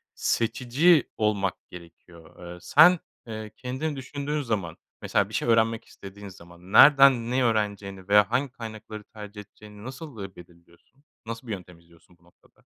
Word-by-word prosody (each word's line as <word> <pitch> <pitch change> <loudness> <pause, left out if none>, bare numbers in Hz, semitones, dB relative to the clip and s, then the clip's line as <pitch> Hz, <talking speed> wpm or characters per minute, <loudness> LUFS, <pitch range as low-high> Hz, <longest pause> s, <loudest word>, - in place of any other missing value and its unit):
seçici 130 +8 +2
olmak 100 -3 0 0.2
gerekiyor. 85 0 -13
Eee, - - -11
sen, 180 - +6 0.3
eee, 110 -1 -7
kendini 130 +5 -4
düşündüğün 145 +2 -4
zaman, 105 - -3 0.2
mesela - - 0
bir - - -14
şey - - -2
öğrenmek 115 0 +2
istediğin 100 +1 -12
zaman, 85 0 -15
nereden 135 -3 +7
ne 130 0 +1
öğreneceğini 100 -4 -2
veya 105 +2 +4
hangi 130 +1 0
kaynakları 110 -3 -9
tercih 105 -1 -11
edeceğini 105 +1 -15
nasıl, 130 -1 -9
eee, 95 -1 -9
belirliyorsun? 85 +9 -19 0.2
Nasıl 115 +2 -7
bir - - -5
yöntem 90 -3 -10
izliyorsun 85 +1 -24
bu 85 - -32
noktada? 90 - -28
110 Hz, 150 wpm, -26 LUFS, 95-125 Hz, 0.3 s, nereden